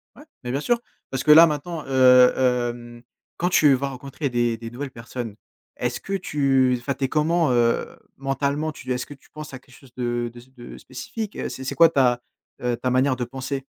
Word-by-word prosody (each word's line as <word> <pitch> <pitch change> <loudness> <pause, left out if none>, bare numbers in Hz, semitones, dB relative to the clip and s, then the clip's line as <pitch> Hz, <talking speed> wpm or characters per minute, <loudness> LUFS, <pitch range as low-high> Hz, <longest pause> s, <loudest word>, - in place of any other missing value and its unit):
Ouais, 290 - -14 0.2
mais 125 - -4
bien 135 - -1
sûr, 240 +8 +1 0.3
parce 135 - -3
que 150 - +5
là 165 +2 +10
maintenant, 160 +1 -4
heu, 125 -1 +6
hem, 120 -2 -1 0.4
quand 175 +1 0
tu 150 -5 +5
vas 140 +2 -1
rencontrer 135 +2 -5
des 120 -1 0
des 115 0 -7
nouvelles 135 +3 -6
personnes, 115 -2 -7 0.4
est-ce 120 0 -2
que 195 - -6
tu 135 -8 +2
enfin 140 +3 -2
tu 135 0 -2
es - - 0
comment, 160 0 +2
heu, 120 -1 +2 0.3
mentalement, 140 +3 -1
tu 130 - -8
est-ce 125 - -4
que 145 - -10
tu 135 - -26
penses 155 -2 -9
à - - -9
quelque 130 -1 -20
chose 130 -3 -19
de 120 -1 -2
de 120 - -16
s 130 +2 -19
de 120 -2 -11
spécifique, 205 - -7
heu, - - -4
c'est 130 - -7
c'est 130 - -3
quoi 165 -1 +7
ta, 125 -5 +2 0.4
heu, 125 -1 -1
ta 125 +1 -1
manière 130 +1 +2
de 125 - -3
penser? 130 +2 -5
130 Hz, 220 wpm, -23 LUFS, 125-145 Hz, 0.4 s, là